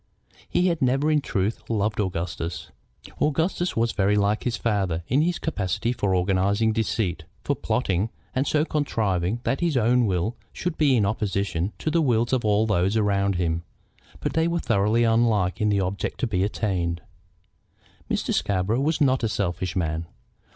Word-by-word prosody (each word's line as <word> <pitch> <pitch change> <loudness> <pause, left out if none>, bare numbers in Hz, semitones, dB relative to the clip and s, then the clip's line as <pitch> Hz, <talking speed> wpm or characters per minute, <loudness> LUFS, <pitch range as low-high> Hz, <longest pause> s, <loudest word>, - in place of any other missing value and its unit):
He 180 - +2
had 170 -3 +1
never, 135 +4 +2
in 150 -1 +3
truth, 100 -4 -1
loved 110 -1 0
Augustus. 85 -3 -3 0.5
Augustus 165 +3 0
was 115 0 +2
very 100 +1 +2
like 105 +1 +1
his 120 -2 0
father 95 -7 -1
in 135 +5 +2
his 175 +2 +1
capacity 115 - -1
for 100 -5 0
organizing 100 +4 +2
deceit, 100 -6 -1 0.2
for - - 0
plotting, 95 +4 0 0.2
and 130 +2 0
so 155 0 +2
contriving 110 - -1
that 135 - 0
his 170 -5 +1
own 120 0 +3
will 95 +5 -1 0.2
should 175 -2 -3
be 145 -5 +3
in 110 -4 +3
opposition 100 -3 -1
to 155 - -2
the 165 +1 +3
wills 120 -4 +1
of 130 - +1
all 105 0 +3
those 100 0 +1
around 100 -2 +1
him. 85 -2 0 0.6
But - - -2
they 160 +1 +2
were 170 0 0
thoroughly 115 -4 +2
unlike 115 -5 +2
in 105 - +3
the 100 -1 +2
object 95 +2 -3
to - - +2
be 95 -5 0
attained. 90 -5 -1 1.1
Mr. - - -1
Scarborough 100 +5 0
was 155 +2 0
not 130 -3 +3
a 115 - +1
selfish 90 -3 -2
man. 80 -2 -1
105 Hz, 170 wpm, -25 LUFS, 95-125 Hz, 1.1 s, in